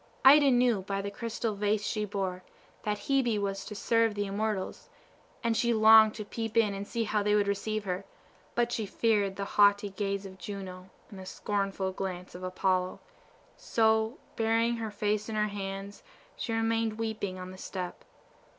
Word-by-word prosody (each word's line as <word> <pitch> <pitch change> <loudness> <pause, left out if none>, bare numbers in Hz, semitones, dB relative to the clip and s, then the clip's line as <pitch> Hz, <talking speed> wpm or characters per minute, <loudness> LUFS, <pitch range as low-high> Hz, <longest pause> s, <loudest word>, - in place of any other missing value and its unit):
Ida 285 +1 +8
knew 245 -5 +3
by 195 +1 -3
the 200 - -4
crystal 230 +1 -3
vase 210 +1 0
she 215 -2 -1
bore, 190 -2 -3 0.4
that 210 -1 -1
Hebe 250 -3 +1
was 195 -1 -2
to 210 - -7
serve 230 +1 +2
the 205 0 -1
immortals, 205 -1 -3 0.5
and 230 -1 +1
she 235 0 +2
longed 220 0 +7
to 215 - -6
peep 225 +1 -4
in 215 -3 +4
and 200 +1 -5
see 230 +1 -1
how 210 -1 0
they 210 0 +2
would 205 -1 +2
receive 215 +1 -1
her; 185 0 -3 0.5
but 240 0 +1
she 220 -3 -2
feared 205 -3 +1
the 200 - -3
haughty 205 0 +4
gaze 200 0 -2
of 190 -1 -10
Juno, 185 -1 -7 0.2
and 195 - -9
the 190 - -8
scornful 195 -1 -2
glance 185 -1 -5
of 180 - -9
Apollo; 185 0 0 0.6
so, 220 +1 +1 0.2
burying 230 +1 +2
her 225 -1 -3
face 210 +1 -1
in 220 - -3
her 210 0 +1
hands, 195 0 -6 0.3
she - - -4
remained 225 -1 0
weeping 220 -4 -3
on 185 0 -7
the 185 - -11
step. 180 -2 -6
205 Hz, 180 wpm, -30 LUFS, 195-225 Hz, 0.6 s, Ida